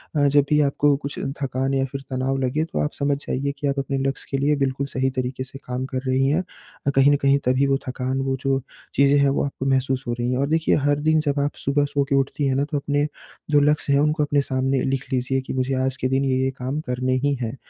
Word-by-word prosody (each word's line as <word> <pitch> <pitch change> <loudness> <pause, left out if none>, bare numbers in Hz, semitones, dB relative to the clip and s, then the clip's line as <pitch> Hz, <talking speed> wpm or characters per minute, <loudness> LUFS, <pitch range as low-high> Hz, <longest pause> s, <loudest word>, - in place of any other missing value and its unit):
अ, 145 -1 +4
जब 140 0 +4
भी 150 - +4
आपको 145 0 +3
कुछ 140 0 -6 0.2
थकान 135 0 -1
या 135 0 +1
फिर 135 - -5
तनाव 130 +1 0
लगे 145 +5 0
तो - - 0
आप 150 - -1
समझ 140 0 +1
जाइए 140 +2 -1
कि 145 - -2
आप 140 0 0
अपने 135 0 -2
लक्ष्य 135 - -4
के 135 - +1
लिए 150 +1 +3
बिल्कुल 135 0 -1
सही 130 -1 0
तरीके 130 +1 -3
से 135 +1 -10
काम 125 +1 -3
कर 130 -1 -3
रही 130 +1 +2
हैं, 160 +6 +1 0.4
अ, - - +5
कहीं 135 +1 +6
न - - +5
कहीं 140 0 +4
तभी 130 +2 +3
वो 135 0 +2
थकान, 130 +1 -2
वो 135 0 0
जो 135 -1 +1 0.3
चीज़ें 140 +1 +4
हैं 140 0 +4
वो 135 - +1
आपको 135 -1 -5
महसूस 130 -1 +1
हो 120 - 0
रही 120 0 -2
हैं। 125 - 0
और 140 - +1
देखिए 160 0 +2
हर 145 0 +2
दिन 155 0 +4
जब 140 0 +1
आप 145 +1 -1
सुबह 145 +1 +2
सो 145 0 0
के 140 - +2
उठती 135 +1 0
हैं 135 - +1
ना 140 +1 +1
तो 150 - 0
अपने 145 +1 0 0.4
जो 145 - +6
लक्ष्य 145 -1 +2
हैं 140 - +4
उनको 150 +1 +2
अपने 145 -1 +2
सामने 135 -1 0
लिख 135 0 -1
लीजिए 130 +1 0
कि 130 - -6
मुझे 130 +1 -1
आज 130 -1 -2
के 130 - -1
दिन 135 +1 +1
ये-ये 130 0 +1
काम 130 +4 -3
करने 130 +1 0
ही 145 0 +2
हैं। 115 0 -3
135 Hz, 260 wpm, -23 LUFS, 130-145 Hz, 0.4 s, कहीं